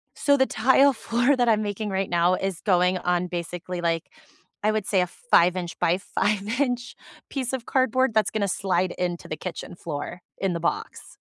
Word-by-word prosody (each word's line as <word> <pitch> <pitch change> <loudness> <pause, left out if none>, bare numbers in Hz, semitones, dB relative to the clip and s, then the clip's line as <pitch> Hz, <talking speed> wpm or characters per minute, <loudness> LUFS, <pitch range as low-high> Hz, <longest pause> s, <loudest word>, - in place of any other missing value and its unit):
So 285 -1 +3
the 265 - +4
tile 270 +4 +4
floor 240 +3 +1
that 245 -2 +1
I'm 215 -1 +3
making 210 0 -3
right 190 0 -1
now 175 +1 +3
is 190 -2 -3
going 180 -1 +3
on 180 0 0
basically, 175 +1 -5
like, 165 -1 -1 0.5
I 215 - +3
would 215 -2 -1
say 190 -3 +2
a 180 - 0
5 180 - +3
inch 175 -2 -5
by 170 +2 +2
5 210 +3 -1
inch 245 -4 -1 0.3
piece 265 -2 -3
of 255 -3 -3
cardboard 260 -1 +2
that's 215 -2 +3
gonna 205 -2 0
slide 185 -1 0
into 175 -1 -3
the 155 - -4
kitchen 180 -1 -7
floor 165 +1 -6 0.2
in 190 -2 -1
the 170 - -2
box. 170 - -4
195 Hz, 190 wpm, -25 LUFS, 175-235 Hz, 0.5 s, the